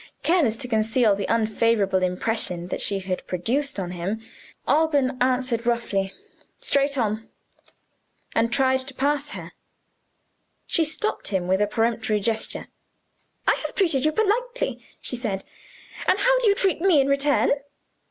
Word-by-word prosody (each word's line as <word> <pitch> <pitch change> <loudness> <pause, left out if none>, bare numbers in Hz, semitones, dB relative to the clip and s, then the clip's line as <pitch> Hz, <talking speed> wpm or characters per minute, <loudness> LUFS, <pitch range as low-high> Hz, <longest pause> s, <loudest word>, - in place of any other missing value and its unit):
Careless 305 -11 +3
to 250 - -2
conceal 220 -1 +2
the 200 -1 -4
unfavorable 220 -3 +2
impression 180 -1 -1
that - - -3
she 195 -1 0
had 185 -1 -4
produced 235 +8 -1
on 180 -2 -3
him, 180 +5 -3 0.5
Alban 285 -2 +2
answered 250 -2 +1
roughly, 200 -5 0 0.5
"Straight 280 0 +1
on," 220 -2 -1 1.0
and 230 0 +2
tried 260 +1 +3
to 260 0 -6
pass 290 +2 0
her. - - -8 1.1
She 335 - +2
stopped 315 +8 -2
him 185 -3 -1
with 190 +2 +2
a 210 - +3
peremptory 225 -1 0
gesture. 220 +2 -2 0.8
"I - - +6
have - - -5
treated 330 -9 +2
you 310 - +3
politely," 475 +6 -1 0.2
she - - -3
said, 205 -5 -3 0.6
"and - - +4
how - - +3
do - - +2
you 400 - +5
treat 380 -5 +1
me 360 -5 +5
in 270 - +4
return? 280 +1 +2
235 Hz, 145 wpm, -24 LUFS, 210-285 Hz, 1.1 s, I